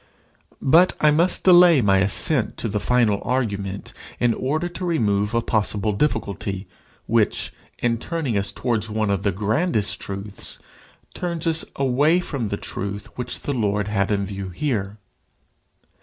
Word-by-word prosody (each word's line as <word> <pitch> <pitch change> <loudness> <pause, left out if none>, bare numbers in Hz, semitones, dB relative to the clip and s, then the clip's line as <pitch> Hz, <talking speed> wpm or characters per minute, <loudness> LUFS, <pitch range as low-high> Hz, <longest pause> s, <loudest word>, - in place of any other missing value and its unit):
But 170 +7 +5
I 150 - +5
must 170 +5 +3
delay 175 -4 +7
my 100 -4 +3
ascent 110 +6 +1
to - - -2
the 105 -1 -1
final 110 -2 +2
argument 100 -6 -2 0.3
in 120 -1 +3
order 150 +9 -1
to 175 +1 -7
remove 105 - +1
a 115 - +1
possible 105 -1 0
difficulty, 100 -6 -2 0.4
which, - - +1 0.2
in 115 -1 0
turning 155 -6 -2
us 100 0 0
towards 115 -3 -2
one 110 -1 0
of 100 - 0
the 100 -1 +1
grandest 110 - 0
truths, 100 +1 -7 0.6
turns 170 -2 -3
us 165 -1 +1
away 140 +6 +3
from 140 -10 -3
the 100 - -3
truth 100 +1 -6
which 125 -1 -4
the 145 - -2
Lord 105 -4 0
had 100 -2 0
in 100 -2 0
view 95 -1 -6
here. 105 - -2
110 Hz, 150 wpm, -22 LUFS, 100-150 Hz, 0.6 s, delay